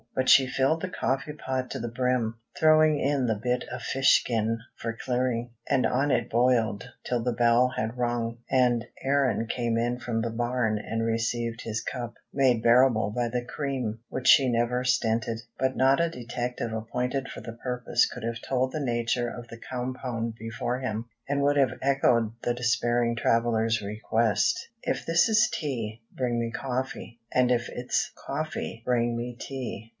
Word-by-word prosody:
But 130 Hz, 0 st, +1 dB
she 135 Hz, -1 st, +7 dB
filled 135 Hz, +5 st, +1 dB
the 185 Hz, -, -3 dB
coffee 135 Hz, -3 st, -1 dB
pot 130 Hz, -3 st, -3 dB
to 135 Hz, -, -3 dB
the 120 Hz, -, -3 dB
brim, 120 Hz, -1 st, 0 dB, 0.2 s
throwing 155 Hz, -1 st, +5 dB
in 140 Hz, -2 st, +1 dB
the 110 Hz, -3 st, 0 dB
bit 125 Hz, +1 st, 0 dB
of 130 Hz, -, -5 dB
fish 135 Hz, +2 st, +4 dB
skin 115 Hz, -1 st, -1 dB, 0.2 s
for 115 Hz, -1 st, -5 dB
clearing; 125 Hz, -2 st, -1 dB, 0.2 s
and 130 Hz, -, +3 dB
on 135 Hz, +3 st, +1 dB
it 120 Hz, -2 st, +1 dB
boiled 115 Hz, -3 st, +2 dB, 0.2 s
till 120 Hz, -2 st, -1 dB
the 125 Hz, -, +1 dB
bell 120 Hz, +1 st, +4 dB
had 110 Hz, +3 st, -2 dB
rung, 120 Hz, -1 st, -1 dB
and 125 Hz, -3 st, +3 dB, 0.2 s
Aaron 135 Hz, -4 st, +1 dB
came 115 Hz, -1 st, -1 dB
in 120 Hz, +1 st, 0 dB
from 115 Hz, -2 st, -2 dB
the 115 Hz, 0 st, -2 dB
barn 120 Hz, -2 st, 0 dB
and 115 Hz, +1 st, -2 dB
received 115 Hz, +1 st, -1 dB
his 110 Hz, -1 st, -3 dB
cup, 120 Hz, -2 st, -5 dB, 0.2 s
made 130 Hz, -4 st, +3 dB
bearable 120 Hz, -3 st, +4 dB
by 120 Hz, -1 st, 0 dB
the 120 Hz, +1 st, -2 dB
cream, 130 Hz, -5 st, -3 dB
which 130 Hz, -, -3 dB
she 135 Hz, -2 st, +7 dB
never 120 Hz, +2 st, +1 dB
stinted. 115 Hz, -2 st, 0 dB, 0.2 s
But 130 Hz, 0 st, 0 dB
not 135 Hz, +4 st, +4 dB
a 170 Hz, -, +2 dB
detective 120 Hz, -3 st, -4 dB
appointed 125 Hz, +4 st, -2 dB
for -, -, -7 dB
the 115 Hz, -, -7 dB
purpose 125 Hz, +1 st, 0 dB
could 125 Hz, -, -8 dB
have 115 Hz, 0 st, -3 dB
told 130 Hz, 0 st, 0 dB
the 155 Hz, -, -2 dB
nature 120 Hz, -1 st, 0 dB
of 120 Hz, 0 st, -8 dB
the 115 Hz, 0 st, -10 dB
compound 125 Hz, -2 st, -4 dB
before 115 Hz, +3 st, -3 dB
him, 115 Hz, -3 st, -3 dB, 0.2 s
and 140 Hz, 0 st, +1 dB
would 145 Hz, 0 st, +3 dB
have 130 Hz, -3 st, +2 dB
echoed 120 Hz, -5 st, +2 dB
the 120 Hz, -, 0 dB
despairing 120 Hz, -1 st, +1 dB
traveler's 115 Hz, -1 st, +2 dB
request: 105 Hz, 0 st, 0 dB
"If -, -, -2 dB
this 165 Hz, +5 st, +3 dB
is 215 Hz, 0 st, +4 dB
tea, 115 Hz, -7 st, -3 dB
bring 125 Hz, -2 st, -1 dB
me 115 Hz, -1 st, -2 dB
coffee; 125 Hz, -2 st, -4 dB
and 125 Hz, -1 st, +3 dB
if 120 Hz, -1 st, +1 dB
it's 125 Hz, 0 st, -1 dB
coffee, 150 Hz, -5 st, -4 dB
bring 120 Hz, -1 st, +1 dB
me 120 Hz, +1 st, -4 dB
tea." 125 Hz, -5 st, -6 dB
120 Hz, 175 wpm, -27 LUFS, 115-130 Hz, 0.2 s, she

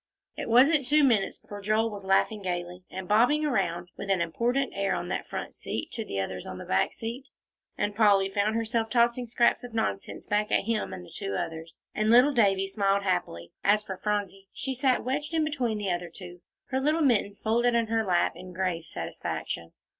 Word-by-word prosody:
It -, -, -5 dB
wasn't 270 Hz, +4 st, +5 dB
two 300 Hz, +2 st, +4 dB
minutes 230 Hz, -8 st, +2 dB
before 205 Hz, 0 st, -10 dB
Joel 215 Hz, +2 st, +1 dB
was 200 Hz, -1 st, -7 dB
laughing 195 Hz, +2 st, +2 dB
gayly, 180 Hz, -1 st, -4 dB
and 190 Hz, 0 st, -6 dB
bobbing 245 Hz, +9 st, +4 dB
around 175 Hz, -, -1 dB
with 200 Hz, -, -6 dB
an 195 Hz, -2 st, +3 dB
important 235 Hz, +11 st, 0 dB
air 195 Hz, -1 st, 0 dB
on -, -, -4 dB
that -, -, -3 dB
front -, -, -5 dB
seat -, -, -5 dB
to 225 Hz, -, -4 dB
the 100 Hz, -, -4 dB
others 95 Hz, -1 st, -4 dB
on 95 Hz, -, -6 dB
the -, -, -8 dB
back 95 Hz, -, +1 dB
seat, 235 Hz, +4 st, -6 dB, 0.5 s
and 205 Hz, 0 st, -1 dB
Polly 200 Hz, -3 st, +4 dB
found 205 Hz, +2 st, 0 dB
herself 230 Hz, 0 st, 0 dB
tossing 235 Hz, +1 st, +2 dB
scraps 235 Hz, +1 st, +2 dB
of 240 Hz, -2 st, -9 dB
nonsense 100 Hz, -, -2 dB
back 210 Hz, 0 st, 0 dB
at -, -, +3 dB
him 225 Hz, +1 st, -1 dB
and 90 Hz, -, -7 dB
the -, -, -15 dB
two 100 Hz, -, -3 dB
others, 160 Hz, +4 st, -5 dB, 0.2 s
and 215 Hz, 0 st, 0 dB
little 250 Hz, +5 st, +6 dB
Davie 195 Hz, -5 st, +3 dB
smiled 200 Hz, 0 st, +1 dB
happily. 175 Hz, -, -2 dB
As 210 Hz, +1 st, +3 dB
for 190 Hz, -, -5 dB
Phronsie, 195 Hz, -1 st, -3 dB
she 265 Hz, 0 st, -3 dB
sat 260 Hz, -1 st, +1 dB
wedged 295 Hz, +5 st, -2 dB
in 320 Hz, -, +3 dB
between 260 Hz, -8 st, -1 dB
the 200 Hz, -3 st, -1 dB
other 175 Hz, 0 st, -3 dB
two, 175 Hz, 0 st, -11 dB, 0.3 s
her 265 Hz, -1 st, 0 dB
little 305 Hz, +4 st, +1 dB
mittens 210 Hz, -7 st, +2 dB
folded 235 Hz, +2 st, +2 dB
in 230 Hz, -1 st, +3 dB
her 225 Hz, 0 st, 0 dB
lap, 180 Hz, -4 st, +2 dB
in 185 Hz, 0 st, -10 dB
grave 180 Hz, -2 st, -2 dB
satisfaction. 85 Hz, -, -5 dB
210 Hz, 205 wpm, -28 LUFS, 185-240 Hz, 0.5 s, little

